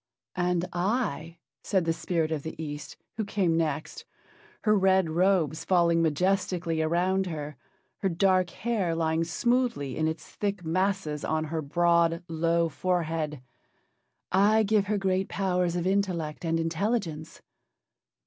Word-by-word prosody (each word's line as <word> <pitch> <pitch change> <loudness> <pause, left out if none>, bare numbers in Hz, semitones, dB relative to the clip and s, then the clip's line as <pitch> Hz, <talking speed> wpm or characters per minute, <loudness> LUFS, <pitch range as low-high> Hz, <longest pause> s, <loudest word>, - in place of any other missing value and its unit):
"And 180 -1 +1
I," 175 - -1 0.2
said 190 -4 0
the 165 - +2
spirit 165 -1 -1
of 155 -2 -1
the 160 - -6
East, 150 -2 -6 0.2
who 220 - 0
came 195 -5 0
next, 160 - -2 0.6
her 215 -1 +4
red 190 -3 +3
robes 175 -3 +2
falling 170 -2 +3
majestically 170 0 0
around 180 +4 +1
her, 150 -3 -5 0.4
her 195 - 0
dark 185 +1 +2
hair 200 -7 -1
lying 160 0 +1
smoothly 235 - 0
in 155 - 0
its 160 0 -4
thick 200 -4 -3
masses 185 -3 -1
on 155 0 0
her 160 +1 -3
broad, 170 +2 +2
low 165 0 +1
forehead, 160 -4 -2 0.9
"I 210 +4 +4
give 205 -1 +2
her 210 0 +1
great 190 -1 0
powers 180 -2 0
of 175 -1 -1
intellect 185 -6 -1
and 165 0 +1
intelligence." 165 -1 -2
170 Hz, 135 wpm, -27 LUFS, 160-190 Hz, 0.9 s, her